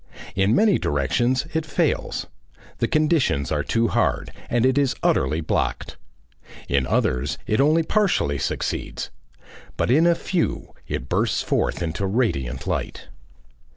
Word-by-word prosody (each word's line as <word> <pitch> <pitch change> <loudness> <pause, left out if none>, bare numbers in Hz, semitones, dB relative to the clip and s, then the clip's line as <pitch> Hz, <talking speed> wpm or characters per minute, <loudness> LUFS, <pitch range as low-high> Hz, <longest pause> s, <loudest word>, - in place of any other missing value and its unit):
In 95 +4 +3
many 215 +3 +4
directions 120 - +1
it 160 0 0
fails; 150 - -1 0.5
the - - +1
conditions 150 - +1
are - - +1
too 115 0 +1
hard - - 0 0.2
and 120 0 +2
it 130 0 +3
is 140 -3 +2
utterly 75 +5 +2
blocked. 80 - -2 0.7
In 65 -1 +1
others 60 -1 0
it 110 +5 +2
only 155 +3 +4
partially 170 - +1
succeeds. 65 - -3 0.7
But - - +1
in 160 +6 +5
a 170 - +4
few 175 0 -2
it 60 - -4
bursts - - 0
forth - - 0
into 85 +4 -2
radiant 70 - -1
light. - - -4
120 Hz, 135 wpm, -23 LUFS, -, 0.7 s, in